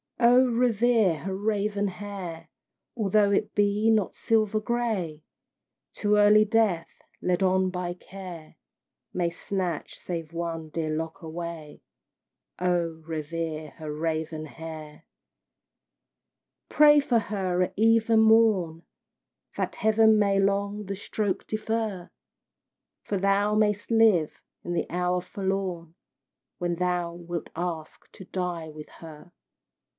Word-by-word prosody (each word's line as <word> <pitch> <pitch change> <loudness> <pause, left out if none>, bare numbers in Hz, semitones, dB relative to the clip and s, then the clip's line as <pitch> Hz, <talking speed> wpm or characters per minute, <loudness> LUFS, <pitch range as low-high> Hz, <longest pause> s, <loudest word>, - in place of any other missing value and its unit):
Oh, 245 +2 +6
revere 230 -6 +2
her 190 +6 -4
raven 205 0 0
hair! 180 -4 -7 0.5
Although 210 -2 +2
it 200 - 0
be 205 +2 +2
not 215 -4 +1
silver 215 -1 +1
gray; 210 -9 -2 0.7
Too 210 0 +1
early 210 +1 +6
Death, 215 -6 +1 0.3
led 180 +1 0
on 190 0 +2
by 180 -1 -3
Care, 180 -4 -10 0.6
May 175 -2 0
snatch 175 -1 -4
save 165 -2 -5
one 165 -2 -4
dear 160 0 -3
lock 160 +4 -5
away. 165 -2 -7 0.8
Oh, 170 -3 -1
revere 160 -1 -4
her 155 -2 -6
raven 155 0 -3
hair! 155 -1 -9 1.6
Pray 295 0 +7
for 245 -5 +2
her 190 -4 -1
at 185 - -3
eve 225 +1 +3
and 220 -1 +5
morn, 210 -7 +3 0.7
That - - -2
Heaven 220 0 +4
may 200 -1 +3
long 200 +1 0
the 195 +1 -4
stroke 200 0 -3
defer, 215 -4 -3 0.9
For 205 - -2
thou 200 +2 +2
mayst 210 0 +1
live 215 -9 +3 0.2
the 175 0 -1
hour 180 +1 0
forlorn 190 -4 -3 0.6
When 175 -1 -1
thou 175 -1 -1
wilt 170 -1 -6
ask 165 -2 -5
to 190 - -11
die 175 -3 -4
with 150 0 -10
her. 160 +1 -12
185 Hz, 120 wpm, -26 LUFS, 165-210 Hz, 1.6 s, Pray